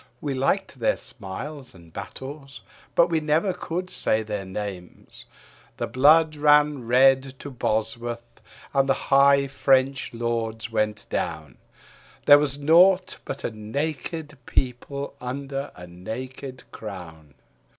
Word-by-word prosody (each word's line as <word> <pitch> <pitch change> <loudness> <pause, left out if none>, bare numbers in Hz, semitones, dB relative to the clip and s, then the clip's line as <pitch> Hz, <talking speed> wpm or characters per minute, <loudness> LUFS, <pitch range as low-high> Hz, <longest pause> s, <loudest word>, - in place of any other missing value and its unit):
We 145 -2 -3
liked 135 +3 0
their 115 - +2
smiles 125 +5 -7
and 85 -2 -17
battles, 140 +1 -8 0.3
but 170 - +6
we 165 - +2
never 155 +5 +1
could 180 +1 -4
say 110 0 0
their 105 -2 -4
names. 95 -2 -7 0.5
The - - -1
blood 155 +4 +5
ran 150 -3 +4
red 135 +2 +4
to 145 - -8
Bosworth 115 0 -3 0.3
and 135 -1 +2
the 135 - +4
high 140 0 +4
French 135 0 +2
lords 115 -1 -3
went 105 -1 -1
down; 80 -6 -3 0.7
There 145 0 +9
was 145 -1 -1
naught 180 +6 +4
but 135 - -5
a - - -2
naked 150 +6 -4
people 135 +3 -2
under 135 +2 -4
a 90 - -10
naked 125 +9 -7
crown. 80 -9 -9
130 Hz, 125 wpm, -25 LUFS, 110-145 Hz, 0.7 s, There